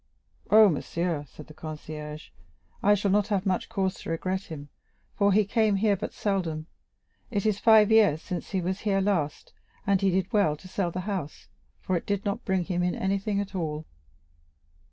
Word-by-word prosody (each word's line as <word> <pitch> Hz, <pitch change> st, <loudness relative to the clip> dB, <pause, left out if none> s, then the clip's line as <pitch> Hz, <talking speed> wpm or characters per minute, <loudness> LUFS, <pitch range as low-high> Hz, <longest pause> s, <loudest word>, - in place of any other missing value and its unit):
"Oh, 215 Hz, 0 st, +8 dB
monsieur," 170 Hz, -2 st, -1 dB
said 150 Hz, -, -12 dB
the 155 Hz, -, -13 dB
concierge, 155 Hz, -1 st, -7 dB, 0.5 s
"I 205 Hz, +1 st, +5 dB
shall 200 Hz, -1 st, 0 dB
not 205 Hz, 0 st, +3 dB
have 200 Hz, -3 st, 0 dB
much 185 Hz, -2 st, 0 dB
cause 195 Hz, -4 st, 0 dB
to -, -, -8 dB
regret 185 Hz, +4 st, -2 dB
him, 145 Hz, -3 st, -8 dB, 0.4 s
for 200 Hz, 0 st, +3 dB
he 210 Hz, +1 st, +4 dB
came 215 Hz, 0 st, +2 dB
here 205 Hz, +1 st, +3 dB
but 200 Hz, -, -5 dB
seldom; 175 Hz, -7 st, -2 dB, 0.6 s
it 205 Hz, -3 st, -2 dB
is 210 Hz, -2 st, +1 dB
five 220 Hz, -1 st, +6 dB
years 210 Hz, -9 st, +5 dB
since 175 Hz, +1 st, -5 dB
he 190 Hz, -2 st, -1 dB
was 185 Hz, +3 st, -2 dB
here 200 Hz, -2 st, +1 dB
last, 185 Hz, -7 st, -1 dB, 0.3 s
and 200 Hz, -2 st, +2 dB
he 195 Hz, -, +3 dB
did 190 Hz, +3 st, -1 dB
well 180 Hz, -8 st, +3 dB
to 185 Hz, -, -13 dB
sell 185 Hz, -1 st, -1 dB
the 185 Hz, +2 st, -4 dB
house, 185 Hz, -6 st, -5 dB, 0.3 s
for 185 Hz, -, -1 dB
it 170 Hz, -, -3 dB
did 200 Hz, 0 st, -1 dB
not 200 Hz, -1 st, -2 dB
bring 190 Hz, -2 st, +1 dB
him 180 Hz, 0 st, -1 dB
in 180 Hz, 0 st, 0 dB
anything 195 Hz, +1 st, -1 dB
at 200 Hz, -1 st, -4 dB
all." 160 Hz, -4 st, -3 dB
190 Hz, 190 wpm, -27 LUFS, 165-205 Hz, 0.6 s, Oh